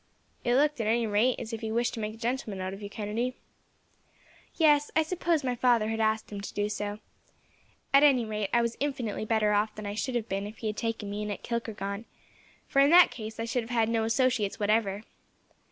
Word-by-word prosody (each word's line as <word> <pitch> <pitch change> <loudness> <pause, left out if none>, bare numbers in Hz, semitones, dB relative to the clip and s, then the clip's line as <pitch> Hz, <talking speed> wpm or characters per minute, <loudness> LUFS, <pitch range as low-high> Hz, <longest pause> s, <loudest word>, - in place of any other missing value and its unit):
"It 240 0 +2
looked, 290 -2 +2
at 215 - -1
any 230 +1 +2
rate, 220 +4 +2
as 225 - -6
if 225 - -4
he 220 -1 -3
wished 235 +2 0
to 230 - -5
make 215 0 -4
a - - -15
gentleman 230 -4 -3
of 195 - -9
you, 205 - -6
Kennedy." 225 +5 -3 1.2
"Yes, 295 -3 +4
I 320 - +4
suppose 335 -2 0
my 250 -1 0
father 235 -3 +3
had 225 0 -2
asked 220 0 0
him 200 -1 -5
to 200 - -7
do 205 0 0
so. 205 0 -3 1.0
At 275 - +8
any 270 -5 +5
rate, 210 -2 -3
I 235 - +3
was 235 0 -1
infinitely 255 -7 -2
better 215 -1 +2
off 210 +1 +1
than 215 - -7
I 205 - -3
should 245 +4 -2
have 230 -2 -1
been 195 +1 -2
if 215 +1 -10
he 230 - -8
had 210 -1 -2
taken 225 -3 -3
me 205 +1 -3
in 210 - -3
at 205 - -5
Kilkargan, 220 -3 -4 0.6
for 275 - +1
in 280 +1 +6
that 350 +2 +8
case 220 -1 -8
I 230 - -1
should 240 +2 -1
have 225 - -10
had 230 -2 +1
no 225 -1 +1
associates, 225 -2 +1
whatever. 210 -1 +1
225 Hz, 225 wpm, -28 LUFS, 210-245 Hz, 1.2 s, At